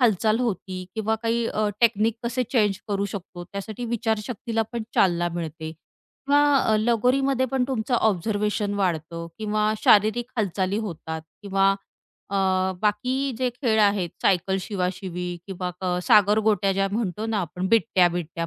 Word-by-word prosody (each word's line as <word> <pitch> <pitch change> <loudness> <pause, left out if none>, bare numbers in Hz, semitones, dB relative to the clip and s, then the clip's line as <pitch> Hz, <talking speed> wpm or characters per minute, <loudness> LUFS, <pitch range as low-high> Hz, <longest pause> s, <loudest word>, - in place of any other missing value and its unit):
हालचाल 220 -1 +3
होती 185 -5 -3
किंवा 220 0 0
काही 230 0 +1
अ, 215 -1 0
टेक्निक 225 -1 +3
कसे 245 +2 0
चेंज 210 -6 +2
करू 200 -1 0
शकतो 175 -2 -7
त्यासाठी 200 +5 -6
विचारशक्तीला 225 0 -1
पण 235 -1 -2
चालना 175 -2 +3
मिळते. 160 -2 -5
किंवा 280 - -2 0.2
अ, 220 - +2
लगोरीमध्ये 250 +4 +2
पण 265 -2 +1
तुमचं 245 -1 -1
ऑब्झर्वेशन 210 0 0
वाढतं 170 -3 -2
किंवा 215 0 0
शारीरिक 220 +4 +4
हालचाली 195 -2 0
होतात 160 -6 -5 0.2
किंवा 195 -1 +3 0.6
अ, 200 - -1 0.5
बाकी 250 +6 0
जे 255 - +1
खेळ 235 -3 +1
आहेत 200 -4 +2
सायकल, 190 0 +2
शिवाशिवी 180 -2 -3 0.2
किंवा 185 -2 -4
अ, 180 -1 0
सागरगोट्या 210 0 +4
ज्या 195 +1 +1
म्हणतो 215 -1 -2
ना 225 -2 0
आपण 180 +1 -3
बिट्ट्या-बिट्ट्या 175 -6 +2
210 Hz, 135 wpm, -24 LUFS, 185-225 Hz, 0.6 s, शारीरिक